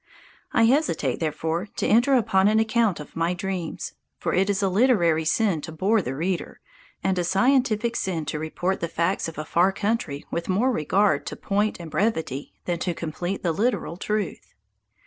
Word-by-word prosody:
I 230 - +3
hesitate, 225 - +2
therefore, 165 +3 -2
to - - -1
enter 240 +5 +4
upon 195 -5 +3
an 215 +1 +3
account 220 -4 +2
of 150 - -10
my 165 +2 0
dreams; 185 -3 -4 0.2
for - - -2
it 190 +2 +2
is 200 0 +1
a - - +3
literary 185 -7 +3
sin 190 -2 +1
to 160 - -7
bore 200 +7 +2
the 135 -6 -4
reader, 175 +5 -3 0.4
and 190 -1 +1
a - - +1
scientific 235 +3 +2
sin 170 -8 -2
to 150 - -3
report 175 +4 -2
the 170 - -2
facts 170 +3 0
of 165 - -8
a 155 - -4
far 175 +4 +3
country 200 -9 -2
with 170 +2 -3
more 220 +8 +2
regard 185 - +1
to - - -4
point 205 +1 -1
and 165 -2 -8
brevity 160 - -1
than 175 -1 -1
to 175 -1 -2
complete 175 +4 -4
and 170 -3 0
literal 225 -5 0
truth. 210 0 -3
185 Hz, 185 wpm, -25 LUFS, 165-215 Hz, 0.4 s, enter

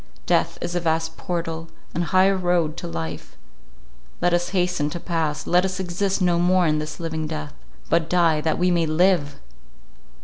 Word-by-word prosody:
Death - - +1
is 175 - -3
a 175 - +1
vast 160 -1 -1
portal, 165 -2 -4 0.3
an 170 - -1
high 185 +2 +4
road 175 -4 +1
to - - -5
life: 80 -1 -6 0.8
let 175 - +2
us 175 0 +1
hasten 180 -5 0
to 170 - -5
pass; 165 -4 -2
let 180 +1 +3
us 190 0 -2
exist 190 +2 -1
no 175 -1 +3
more 180 +1 +3
in 155 -1 +2
this 155 0 -6
living 160 -2 -3
death, 75 - -5 0.3
but 165 0 +1
die 165 -4 +3
that 160 0 0
we 180 0 +2
may 170 -2 +2
live! 155 -2 +2
170 Hz, 175 wpm, -23 LUFS, 155-180 Hz, 0.8 s, high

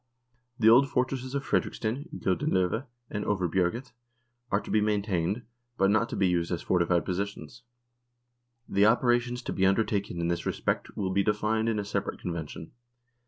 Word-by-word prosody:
The 110 - +3
old 125 +4 +7
fortresses 130 +1 -1
of 140 - -2
Fredriksten, 130 +9 -1
Gylden 90 -3 0
love, 95 +8 +1 0.2
and 105 - -2
Overbjerget 95 +4 0 0.6
are 100 - +2
to - - -8
be 110 - +3
maintained, 105 0 0 0.3
but 95 0 +3
not 110 +2 +2
to - - -4
be 95 - +2
used 85 -1 0
as 85 - -2
fortified 85 -2 +2
positions. 100 +6 -4 1.1
The 100 +2 +4
operations 120 +1 +2
to - - -3
be 95 - -1
undertaken 100 -1 +1
in 85 - 0
this 85 0 -2
respect - - -2
will 95 -2 -1
be 100 +1 +2
defined 110 +2 +1
in 110 - 0
a 105 - -2
separate - - -3
convention. 80 -2 -6
105 Hz, 165 wpm, -28 LUFS, 90-115 Hz, 1.1 s, old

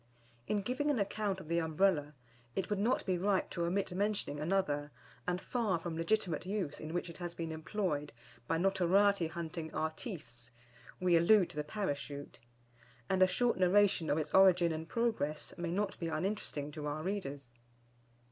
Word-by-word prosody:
In 205 -2 0
giving 255 +7 0
an 290 - +2
account 200 -1 -1
of 175 - -10
the 170 +1 +1
Umbrella, 160 -2 +1 0.4
it 190 - -2
would 205 - +1
not 230 +5 +1
be 185 -2 0
right 195 +1 +2
to 170 -1 -1
omit 190 +3 0
mentioning 200 -6 -1
another, 150 -3 0 0.4
and 180 0 0
far 215 -4 0
from 165 0 -5
legitimate 170 0 0
use 185 -6 -3
in 155 - -6
which 175 +1 -2
it 170 -2 -9
has 175 -1 -5
been 165 -1 -4
employed 160 -2 -2 0.4
by 165 - +1
notoriety 195 0 +3
hunting 165 -1 -5
artistes 155 - -4 0.5
we 180 -1 +3
allude 180 +2 +5
to - - -13
the 150 - -1
Parachute; 145 -5 -4 0.7
and 190 -1 +2
a 185 - +8
short 235 +3 +1
narration 185 -2 +4
of 145 - +2
its 155 - -3
origin 180 -3 +6
and 160 +1 -4
progress 220 -11 -1
may 175 -1 -3
not 200 +3 -1
be 170 - -2
uninteresting 160 -4 -2
to 150 0 -5
our 150 +1 -3
readers. 145 -10 -4
175 Hz, 170 wpm, -34 LUFS, 155-200 Hz, 0.7 s, a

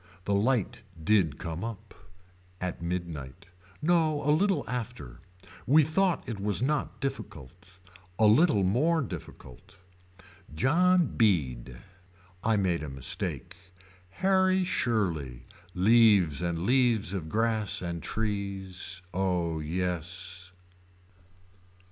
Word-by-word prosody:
The 100 - 0
light 115 +1 0 0.2
did 90 -7 +2
come 85 0 -5
up. 110 -2 -7 0.7
At 90 -2 -4
midnight. 85 -7 -5 0.3
No 155 -3 +2
a - - +5
little 170 - +1
after. 120 - -6 0.5
We 150 +5 +6
thought 175 +4 0
it 115 -4 -5
was 100 0 +1
not 150 +2 -1
difficult. 105 - -5 0.7
A 110 - +4
little 110 - +4
more 145 - +2
difficult. 85 - -10 0.8
John 175 - +3
Beede. 65 - 0 0.7
I 110 -1 +2
made 90 -4 0
a 75 - -5
mistake. 70 +6 -3 0.5
Harry 190 - +2
Shirley. 85 - -1 0.3
Leaves 100 -6 +4
and 85 -1 -2
leaves 120 -5 +2
of 85 -5 -4
grass 110 -1 +1
and 85 -1 -4
trees. 95 -4 -4
Oh 90 -4 -1
yes. 90 +2 -4
100 Hz, 105 wpm, -28 LUFS, 85-125 Hz, 0.8 s, We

